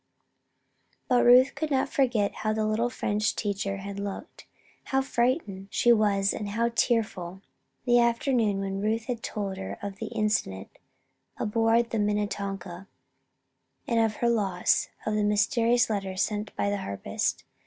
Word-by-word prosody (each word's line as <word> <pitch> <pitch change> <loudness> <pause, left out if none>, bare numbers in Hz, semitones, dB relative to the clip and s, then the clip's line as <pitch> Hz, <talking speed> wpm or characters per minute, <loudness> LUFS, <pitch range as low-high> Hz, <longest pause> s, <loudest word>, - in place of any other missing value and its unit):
But 250 -1 +3
Ruth 255 +3 +6
could 315 - -3
not 265 -2 +1
forget 240 -7 0
how 215 0 0
the 215 0 0
little 220 +3 0
French 210 -2 -1
teacher 200 -1 -2
had 200 0 -6
looked 200 -1 -7 0.4
how 270 -1 +1
frightened 235 - -1
she 240 +3 +4
was 205 -3 +2
and 210 -2 -4
how 230 +3 0
tearful 205 -7 -1 0.4
the 240 0 +5
afternoon 235 -3 +2
when 195 0 -3
Ruth 220 +2 -1
had 240 -1 -4
told 200 -3 -4
her 195 - -6
of 200 -1 -5
the 225 - -4
incident 210 - -1 0.7
aboard 225 +2 +1
the 225 - -1
Minnetonka, 200 -3 -3 1.0
and 230 -1 +2
of 220 -1 +1
her 240 - 0
loss 195 -6 +1 0.2
of 215 - -1
the 210 0 +1
mysterious 230 +3 +2
letter 195 -3 -3
sent 210 +2 -2
by 200 - 0
the 205 - -1
harpist. 100 - -3
215 Hz, 150 wpm, -27 LUFS, 200-235 Hz, 1.0 s, Ruth